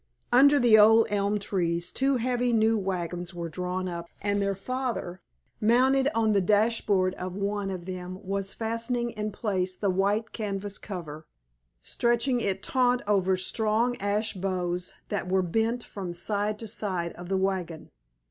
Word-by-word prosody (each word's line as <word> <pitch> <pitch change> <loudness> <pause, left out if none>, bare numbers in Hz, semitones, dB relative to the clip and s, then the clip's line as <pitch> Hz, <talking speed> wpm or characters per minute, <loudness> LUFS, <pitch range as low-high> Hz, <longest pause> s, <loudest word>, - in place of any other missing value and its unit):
Under 280 +4 +6
the 230 -3 +6
old 225 +2 +7
elm 205 0 +1
trees 175 -4 -1
two 270 0 +1
heavy 245 0 0
new 225 0 +3
wagons 180 -3 -3
were 170 -1 -4
drawn 180 +3 -3
up, 170 -1 -5
and 205 0 0
their 200 0 0
father, 240 -5 -4 0.4
mounted 260 +5 +4
on 225 -1 +2
the 200 -2 +3
dash 215 +4 +2
board 185 -3 +2
of 180 0 -5
one 200 0 -2
of 185 -2 -5
them 185 0 -6
was 195 0 -2
fastening 230 +1 -2
in 215 -1 -4
place 190 -4 -2
the 200 0 0
white 200 +4 0
canvas 200 -2 -4
cover, 160 -6 -7 0.6
stretching 240 +1 +1
it 195 -3 -1
taut 250 -1 +2
over 190 -2 +2
strong 220 +5 +1
ash 205 +2 0
bows 180 -2 -3
that 200 -3 -2
were 190 0 +2
bent 225 +7 0
from 185 -4 -6
side 205 +3 -1
to 225 - -8
side 185 -5 -2
of 175 +1 -10
the 195 - +1
wagon. 185 -4 -2
200 Hz, 160 wpm, -27 LUFS, 185-225 Hz, 0.6 s, old